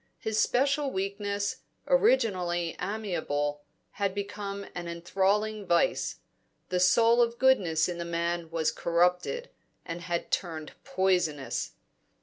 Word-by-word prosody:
His 220 -1 -1
special 280 +2 +2
weakness, 200 -1 -2 0.3
originally 185 - +2
amiable, 165 -8 -2 0.3
had 200 -1 -2
become 200 0 -4
an 175 -1 -5
enthralling 195 +5 0
vice; 170 -1 +2 0.5
the 180 - 0
soul 230 +6 +5
of 235 0 +1
goodness 190 -13 +3
in 175 -1 -4
the - - -2
man 170 0 -2
was 160 -1 0
corrupted, 180 - +1 0.3
and 170 +1 -5
had 170 -1 -3
turned 160 -4 -2
poisonous. 180 - 0
185 Hz, 115 wpm, -29 LUFS, 170-210 Hz, 0.5 s, soul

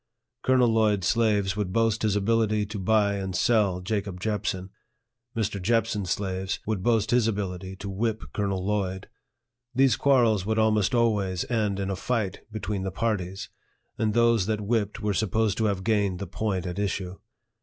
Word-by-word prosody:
Colonel 130 -2 +4
Lloyd's 105 -4 +2
slaves 105 -3 +2
would 105 -3 -2
boast 115 +1 +1
his 105 -2 +1
ability 110 0 +1
to 105 0 -6
buy 100 +1 +2
and 95 -1 -4
sell 100 -6 +2
Jacob 100 -1 -3
Jepson. 95 -2 -2 0.7
Mr. 105 -3 -1
Jepson's 110 -2 0
slaves 95 0 -2
would 110 -3 -1
boast 110 0 +1
his 120 -2 +3
ability 95 -3 -3
to 100 +1 -8
whip 110 +3 -2
Colonel 100 -3 -1
Lloyd. 95 -2 -2 0.7
These 130 -3 +4
quarrels 120 -8 +3
would 110 +2 -1
almost 110 +1 +2
always 105 -6 +1
end 105 -4 0
in 100 0 -2
a - - -1
fight 110 -2 -2
between 105 -2 -3
the 95 - -2
parties, 95 -2 -2 0.5
and 110 -1 0
those 115 -4 +3
that 110 -1 -1
whipped 105 -1 -1
were 105 -1 +1
supposed 110 +1 0
to 110 - +2
have 100 -3 0
gained 100 -4 +1
the 100 - -5
point 95 0 -2
at 90 +2 -4
issue. 95 -2 -2
105 Hz, 165 wpm, -26 LUFS, 95-110 Hz, 0.7 s, Colonel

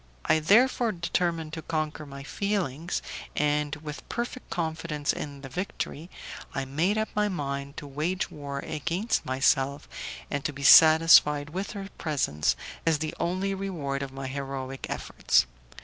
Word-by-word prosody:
I 160 - +4
therefore 230 +6 +4
determined 170 -2 -1
to 160 - -4
conquer 155 -1 -3
my 140 0 -8
feelings, 175 -3 -2 0.3
and, 150 0 +1
with 150 0 -8
perfect 240 +2 -4
confidence 160 -3 -1
in 140 -2 -6
the 135 - -7
victory, 170 +1 -4 0.5
I 135 - -1
made 165 +10 +1
up 220 0 0
my 210 0 +1
mind 140 -5 -4
to - - -6
wage 155 +8 -2
war 140 -2 -6
against 175 +9 -1
myself, 135 +2 +2 0.4
and 140 -1 -1
to - - -1
be 140 0 -8
satisfied 155 -2 +7
with 190 +5 -4
her 200 -2 -6
presence 135 - +1 0.3
as 165 -2 +3
the 155 +1 -3
only 185 +3 0
reward 165 -8 -3
of 135 -1 -4
my 135 0 -6
heroic 135 -1 -5
efforts. - - +2
155 Hz, 150 wpm, -27 LUFS, 140-180 Hz, 0.5 s, satisfied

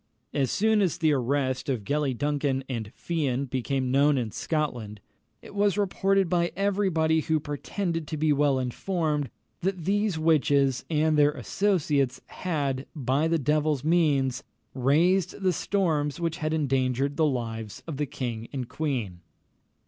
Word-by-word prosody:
As 135 -4 +1
soon 220 +1 +2
as 180 -4 +1
the 160 -3 +3
arrest 130 +1 0
of 125 -6 -1
Gellie 140 +1 -1
Duncan 145 -1 0
and 115 -5 -4
Fian 140 -6 -1
became 130 0 -1
known 140 +2 +4
in 115 -4 -2
Scotland, 120 -11 -3 0.4
it - - -12
was 205 -1 +2
reported 195 -1 +2
by 170 0 +1
every 200 0 +1
body 160 -1 +2
who 160 0 +1
pretended 165 +3 -3
to 155 - -4
be 155 0 +3
well 145 -1 +2
informed, 150 +3 -1 0.3
that 185 -3 -2
these 205 -2 +1
witches 140 -5 +2
and 155 -1 +2
their 145 0 +5
associates 150 -9 0
had, 140 -6 -3
by 140 +2 +1
the 165 0 +2
devil's 150 -1 +1
means, 145 -6 +2 0.3
raised 160 +10 +2
the 190 -2 +2
storms 155 -5 0
which 165 -1 -1
had 155 -2 -2
endangered 135 -2 0
the 155 +1 +3
lives 115 -5 -4
of 160 -5 -5
the 150 0 -1
king 120 -5 -4
and 130 -4 -4
queen. 125 - -3
150 Hz, 150 wpm, -27 LUFS, 130-165 Hz, 0.4 s, their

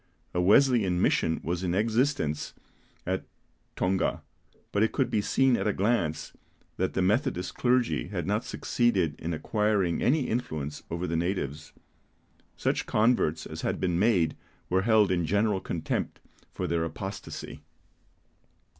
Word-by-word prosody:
A 90 - +1
Wesleyan 100 -2 +4
mission 80 -2 +2
was 85 +2 -2
in 90 -1 0
existence 110 - 0 0.5
at - - -1 0.5
Tonga; 95 +1 0 0.5
but 100 - +1
it 110 - +2
could - - 0
be 105 - +2
seen 130 +4 +3
at - - -1
a 105 - +2
glance 95 -7 0 0.4
that 95 - 0
the 95 - +2
Methodist 105 - 0
clergy 120 - +1
had - - -3
not - - 0
succeeded 95 -10 0
in 85 - -3
acquiring 100 +1 0
any 150 +5 +3
influence 80 - -3
over 85 +2 -3
the 85 -1 -2
natives. 80 -4 -2 0.9
Such - - -1
converts 105 -8 +2
as - - -7
had - - -1
been 90 -2 0
made 95 -7 +3 0.4
were 95 +1 +3
held 110 -2 +4
in 90 -2 +1
general 105 +1 +2
contempt 80 -3 -3 0.3
for 90 - -4
their 85 -1 0
apostasy. 95 +4 -6
95 Hz, 140 wpm, -28 LUFS, 85-110 Hz, 0.9 s, Wesleyan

